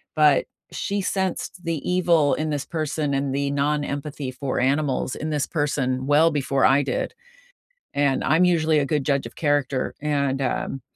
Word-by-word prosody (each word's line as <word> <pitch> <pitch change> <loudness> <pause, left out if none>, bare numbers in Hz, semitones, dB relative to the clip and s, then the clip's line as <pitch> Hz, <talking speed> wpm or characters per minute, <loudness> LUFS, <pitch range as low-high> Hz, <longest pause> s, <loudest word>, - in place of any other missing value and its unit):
but 150 -2 +4 0.3
she 200 0 -2
sensed 190 -1 -2
the 165 -3 -3
evil 170 -5 +3
in 155 0 -1
this 145 -2 -2
person 155 -2 -2
and 135 0 -1
the 140 0 -1
non-empathy 145 -1 -2
for 130 +1 -3
animals 135 0 0
in 155 - -4
this 150 -2 0
person 135 -4 -1
well 150 +3 +5
before 135 -2 +1
I 135 +2 +5
did, 130 -2 -2 0.8
and 140 -1 +1
I'm 160 +5 +4
usually 160 -3 +3
a 140 - 0
good 150 -1 0
judge 140 -3 0
of 115 - -11
character, 145 -4 0
and, 140 -2 0
um, 135 +1 -2
145 Hz, 165 wpm, -23 LUFS, 135-155 Hz, 0.8 s, well